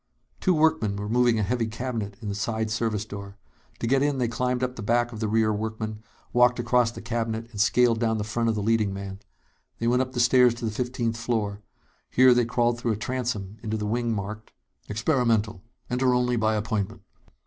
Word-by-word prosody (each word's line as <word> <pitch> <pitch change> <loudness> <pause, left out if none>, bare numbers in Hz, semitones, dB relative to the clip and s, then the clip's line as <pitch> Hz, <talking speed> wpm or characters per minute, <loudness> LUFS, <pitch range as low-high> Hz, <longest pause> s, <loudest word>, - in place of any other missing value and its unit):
Two 185 -2 +2
workmen 155 -10 +2
were 100 +1 -4
moving 120 +1 +3
a 110 - +1
heavy 115 +3 0
cabinet 110 -3 -4
in - - -4
the 100 - -2
side 110 +2 -2
service 110 -2 -1
door. 100 -1 -8 0.4
To - - -3
get 135 +3 +3
in, 145 -1 +1
they 125 -2 +1
climbed 125 +2 -1
up 125 0 -2
the 115 - -7
back 120 +3 +1
of 110 - -8
the 110 - -1
rear 110 0 +2
workman, 110 0 -4 0.3
walked 125 0 +5
across 120 0 +2
the 115 - -9
cabinet, 115 0 -3
and 105 -3 -2
scaled 115 +1 +3
down 110 -1 +1
the 105 - -2
front 115 +2 -1
of 110 - +1
the 105 - -2
leading 110 -2 +1
man. 95 0 -6 0.6
They 115 - -3
went 125 +2 +3
up 130 0 -3
the 125 - -2
stairs 125 0 +5
to 120 - -5
the 110 - -1
fifteenth 120 0 -2
floor. 110 -4 -2 0.5
Here 130 0 +6
they 120 -1 +3
crawled 120 0 +1
through 115 -1 0
a - - -4
transom 115 -4 -3
into 110 -1 -2
the 105 - -3
wing 120 +2 0
marked: 105 +1 -5 0.4
"Experimental. 115 - +1 0.3
Enter 125 0 +2
Only 125 0 +1
By 110 -1 +1
Appointment." 105 -2 -2
115 Hz, 210 wpm, -26 LUFS, 110-125 Hz, 0.6 s, Here